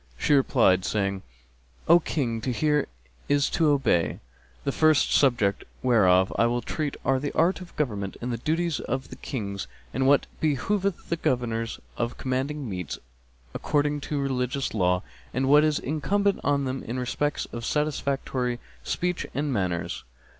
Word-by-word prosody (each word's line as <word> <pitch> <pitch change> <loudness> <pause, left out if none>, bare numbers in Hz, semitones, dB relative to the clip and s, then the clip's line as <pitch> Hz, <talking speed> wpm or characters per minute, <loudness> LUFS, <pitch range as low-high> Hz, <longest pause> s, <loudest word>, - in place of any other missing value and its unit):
She 145 - +2
replied, 120 -9 +4
saying: 100 -2 -1 0.7
"O 170 +2 +8
King, 120 -8 -2
to 130 - -1
hear 150 +3 +1 0.4
is 145 -1 +2
to 160 -3 +3
obey.[FN#259] 100 - +2 0.4
The 140 - 0
first 155 0 +3
subjects 120 -8 +3 0.2
whereof 95 -7 +4
I 115 - +5
will 120 0 -1
treat 150 +2 -3
are 135 0 +3
the 145 +2 -3
art 180 +4 +2
of 180 - -11
government 105 -9 -2
and 120 +1 -3
the 115 - -3
duties 165 +3 0
of 130 +1 -3
Kings 100 -6 -4 0.3
and 130 +2 +1
what 140 0 +5
behoveth 180 +6 0
governors 115 -2 -1 0.2
of 120 0 -2
command 130 +1 -1 0.2
meets 90 -6 -4 0.6
according 145 0 0
to 150 - 0
religious 135 0 -1
law, 90 -3 +2 0.3
and 130 +1 +1
what 145 +2 +6
is 155 -1 +2
incumbent 200 +8 0
on 140 -1 +2
them 130 0 -3
in 120 +3 -5
respect 145 +4 -1
of 115 - -5
satisfactory 135 -3 -1 0.3
speech 180 0 -1
and 145 -1 0
manners. 90 -5 -2
135 Hz, 150 wpm, -26 LUFS, 115-150 Hz, 0.7 s, O